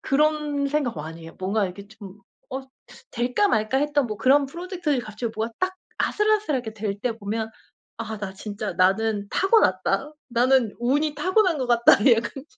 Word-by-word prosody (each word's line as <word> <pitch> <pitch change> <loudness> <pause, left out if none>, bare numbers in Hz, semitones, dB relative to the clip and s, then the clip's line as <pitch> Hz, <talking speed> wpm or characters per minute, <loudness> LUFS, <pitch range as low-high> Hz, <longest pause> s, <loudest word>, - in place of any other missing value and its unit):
그런 295 0 +1
생각 285 -4 -1
많이 160 +2 -7
해요. 165 - -11
뭔가 195 +3 0
이렇게 195 +2 -7
좀 205 -2 -12 0.3
어 265 +1 -4 0.5
될까 250 - +1
말까 220 - +1
했던 290 -1 +1
뭐 215 - -5
그런 275 +5 +4
프로젝트들이 340 -2 -2
갑자기 215 +1 -5
뭐가 225 +1 -2
딱 370 0 -1 0.2
아슬아슬하게 420 - +1
될 205 -2 -4
때 235 +2 -1
보면 220 +1 -4 0.5
'아 220 -1 -4
나 200 -2 -5
진짜 205 +1 -5
나는 205 +2 +1
타고났다. 280 - +2 0.2
나는 245 -2 +3
운이 290 +5 +1
타고난 365 +2 +2
것 260 - -1
같다.' 235 -1 +5 0.2
약간 235 +4 -4
240 Hz, 325 characters per minute, -24 LUFS, 210-295 Hz, 0.5 s, 같다